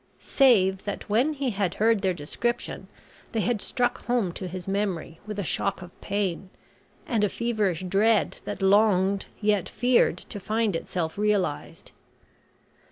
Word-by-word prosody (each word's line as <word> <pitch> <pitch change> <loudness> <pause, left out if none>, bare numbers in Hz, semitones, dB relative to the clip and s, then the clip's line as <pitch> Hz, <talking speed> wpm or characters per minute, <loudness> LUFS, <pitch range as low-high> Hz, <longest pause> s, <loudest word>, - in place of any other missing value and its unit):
save 195 -8 +4
that 205 - -5
when 250 +9 +3
he 275 -3 -2
had 195 -4 -1
heard 220 -1 +3
their 190 -2 +2
description 180 +9 -3 0.5
they 225 - +1
had 220 -1 0
struck 245 -1 -1
home 240 -7 +1
to 185 +2 -6
his 180 0 -7
memory 195 -5 -2
with 210 -1 -5
a 200 - -1
shock 195 +2 -1
of 175 - -15
pain, 195 -2 -2 0.6
and 225 -4 0
a 210 - +3
feverish 210 -8 -1
dread 200 +4 +2
that 195 - -5
longed 195 -1 +3
yet 205 -3 +1
feared 250 0 +2
to 205 - -8
find 215 -1 0
itself 165 +1 -3
realised. 205 -8 -1
205 Hz, 150 wpm, -26 LUFS, 185-225 Hz, 0.6 s, save